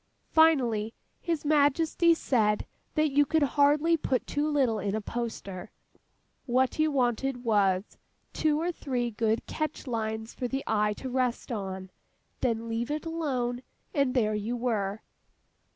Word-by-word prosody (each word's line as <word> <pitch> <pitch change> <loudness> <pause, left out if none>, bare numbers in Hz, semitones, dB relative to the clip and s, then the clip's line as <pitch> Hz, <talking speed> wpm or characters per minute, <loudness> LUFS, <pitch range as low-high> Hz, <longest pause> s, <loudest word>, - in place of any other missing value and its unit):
Finally, 245 -9 +3 0.2
His 330 -4 -2
Majesty 310 +3 +3
said 215 -9 +1 0.3
that 310 -2 +2
you 290 +2 +5
could 315 +1 +2
hardly 295 +4 +3
put 265 -4 -1
too 295 +1 -1
little 260 -7 +2
in 200 +1 -1
a - - 0
poster; 210 -4 -5 0.8
what 260 +3 +1
you 310 0 +4
wanted, 250 -1 0
was, 200 -4 +1 0.3
two 305 -1 +1
or 345 +2 0
three 250 -7 -2
good 220 +1 0
catch 310 -1 -4
lines 220 -2 -3
for 250 - -3
the 270 +2 -3
eye 210 -1 +1
to 260 - -7
rest 255 -1 -1
on—then, 205 +3 -5
leave 230 +2 -2
it 300 +2 -3
alone—and 275 -2 -2
there 215 -4 +2
you 215 +4 -2
were! 215 -4 -1
245 Hz, 135 wpm, -28 LUFS, 220-290 Hz, 0.8 s, you